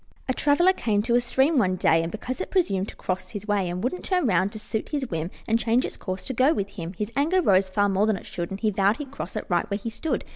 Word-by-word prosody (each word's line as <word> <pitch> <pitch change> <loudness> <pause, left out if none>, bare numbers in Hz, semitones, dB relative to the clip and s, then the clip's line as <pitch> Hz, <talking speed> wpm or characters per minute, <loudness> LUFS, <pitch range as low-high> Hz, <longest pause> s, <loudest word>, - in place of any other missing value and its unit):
A 260 - +1
traveler 325 +8 +4
came 210 - 0
to 235 +1 0
a 240 - +6
stream 265 +5 +2
one 185 -5 +2
day, 165 -2 +3
And 165 +1 -3
because 250 - -4
it - - -4
presumed 200 - +1
to - - -10
cross 185 0 -3
his 210 -2 -7
way, 200 -3 +1
And 180 +2 -4
wouldn't 310 +9 -2
turn 365 -4 +1
round 190 -3 +2
to - - -6
suit 215 +1 -4
his 285 -3 -2
whim 165 0 -2 0.2
And 225 +1 +2
change 235 +2 +2
its - - -5
course 185 -1 -5
to 265 - -2
go 265 +6 +3
with 200 -5 -2
him, 180 -3 -7
His 210 +4 -4
anger 315 +7 +2
rose 195 - +3
far 205 +2 +2
more 200 +2 +2
than 215 -3 +2
it - - -11
should, 170 -1 -4
And 195 - -5
he 215 0 +1
vowed 200 +2 +2
he'd 285 -3 -7
cross 235 -10 -6
right 175 -2 0
where 200 - 0
he 225 +2 -5
stood. 315 +8 -2
210 Hz, 285 wpm, -25 LUFS, 190-260 Hz, 0.2 s, a